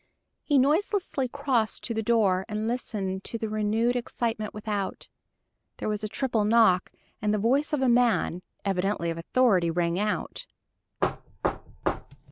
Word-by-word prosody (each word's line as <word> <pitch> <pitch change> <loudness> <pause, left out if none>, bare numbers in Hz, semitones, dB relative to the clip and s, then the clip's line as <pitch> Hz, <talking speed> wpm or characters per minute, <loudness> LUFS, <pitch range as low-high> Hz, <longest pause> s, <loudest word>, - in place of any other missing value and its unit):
He 290 - +2
noiselessly 300 0 +1
crossed 255 -4 0
to 230 - -2
the 220 - -1
door 205 -5 +3
and 215 +1 -2
listened 200 -6 -2
to 230 - -2
the 220 - -3
renewed 215 +3 +1
excitement 230 -3 -2
without. 210 -2 -4 0.7
There - - -4
was 210 0 -2
a - - 0
triple 230 -1 0
knock, 210 -4 +4 0.3
and 210 0 +1
the 215 - +2
voice 260 +8 +2
of 295 -3 +1
a - - +3
man, 235 -8 +3 0.2
evidently 195 -3 0
of 165 - -5
authority, 185 -2 +3
rang 170 +1 0
out. 210 +1 -2
215 Hz, 140 wpm, -27 LUFS, 195-245 Hz, 0.7 s, knock